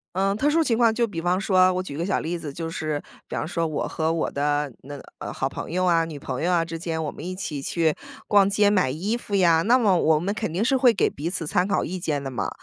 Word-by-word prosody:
呃， 195 Hz, +1 st, +2 dB
特 275 Hz, +9 st, +1 dB
殊 325 Hz, +2 st, +3 dB
情 230 Hz, -6 st, +1 dB
况 230 Hz, -2 st, +4 dB
就 235 Hz, -, +2 dB
比 200 Hz, -7 st, -6 dB
方 180 Hz, +2 st, +1 dB
说， 185 Hz, -2 st, +4 dB
我 185 Hz, -, -2 dB
举 145 Hz, -6 st, -7 dB
个 170 Hz, -, -1 dB
小 190 Hz, -, 0 dB
例 170 Hz, +1 st, -3 dB
子， 145 Hz, -4 st, -7 dB
就 165 Hz, +1 st, -4 dB
是 155 Hz, -2 st, -3 dB, 0.3 s
比 -, -, -6 dB
方 -, -, -2 dB
说 165 Hz, 0 st, -1 dB
我 155 Hz, -, -2 dB
和 160 Hz, 0 st, -1 dB
我 165 Hz, -, -1 dB
的 145 Hz, 0 st, 0 dB
那 145 Hz, +1 st, -8 dB, 0.2 s
呃， -, -, -5 dB
好 135 Hz, -, -2 dB
朋 -, -, -7 dB
友 185 Hz, +2 st, 0 dB
啊、 170 Hz, -2 st, +3 dB
女 160 Hz, -3 st, -7 dB
朋 130 Hz, -1 st, -5 dB
友 175 Hz, -, +1 dB
啊 170 Hz, -1 st, +3 dB
之 165 Hz, 0 st, -6 dB
间， 160 Hz, -1 st, -3 dB
我 150 Hz, -, -3 dB
们 -, -, -11 dB
一 185 Hz, +1 st, -4 dB
起 150 Hz, -7 st, -5 dB
去 160 Hz, +2 st, +1 dB, 0.3 s
逛 200 Hz, -1 st, +4 dB
街 205 Hz, 0 st, +3 dB
买 185 Hz, -9 st, +2 dB
衣 195 Hz, -, -2 dB
服 205 Hz, -4 st, -4 dB
呀， 170 Hz, -4 st, +4 dB
那 240 Hz, +5 st, +5 dB
么 205 Hz, -7 st, +3 dB
我 160 Hz, -2 st, +3 dB
们 190 Hz, +6 st, -1 dB
肯 215 Hz, -6 st, -3 dB
定 195 Hz, +5 st, 0 dB
是 265 Hz, +2 st, +2 dB
会 250 Hz, -2 st, +5 dB
给 195 Hz, -, +2 dB
彼 155 Hz, +4 st, -4 dB
此 170 Hz, -3 st, -3 dB
参 180 Hz, +5 st, +1 dB
考 200 Hz, -, +1 dB
意 185 Hz, +1 st, -4 dB
见 150 Hz, -5 st, -2 dB
的 135 Hz, -, -5 dB
嘛。 105 Hz, -6 st, -2 dB
175 Hz, 305 characters per minute, -24 LUFS, 155-200 Hz, 0.3 s, 那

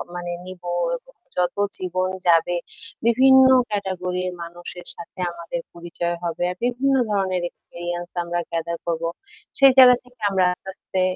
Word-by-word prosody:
মানে 175 Hz, 0 st, -4 dB
নিবো, 180 Hz, -1 st, -7 dB, 0.7 s
যত 180 Hz, -1 st, +1 dB, 0.2 s
জীবন 185 Hz, 0 st, -1 dB, 0.2 s
যাবে 170 Hz, +1 st, +4 dB, 0.5 s
বিভিন্ন 260 Hz, +3 st, +7 dB, 0.2 s
ক্যাটেগরির 185 Hz, -3 st, -2 dB
মানুষের 175 Hz, +1 st, -9 dB
সাথে 170 Hz, +2 st, -11 dB
আমাদের 170 Hz, 0 st, -5 dB
পরিচয় 170 Hz, 0 st, -3 dB
হবে। 170 Hz, 0 st, -2 dB
আর 180 Hz, -, -7 dB
বিভিন্ন 260 Hz, +3 st, +1 dB, 0.2 s
ধরনের 190 Hz, -3 st, 0 dB
এক্সপেরিয়েন্স 175 Hz, 0 st, -7 dB
আমরা 175 Hz, 0 st, -2 dB
গ্যাদার 170 Hz, 0 st, -2 dB
করব। 165 Hz, -1 st, -1 dB, 0.6 s
সেই 275 Hz, -1 st, +8 dB
জায়গা 250 Hz, -1 st, +10 dB
থেকে 250 Hz, -1 st, -23 dB
আমরা 190 Hz, -2 st, +2 dB
আস্তে, 190 Hz, -, -11 dB
আস্তে 190 Hz, 0 st, -3 dB
180 Hz, 135 wpm, -23 LUFS, 175-195 Hz, 0.7 s, জায়গা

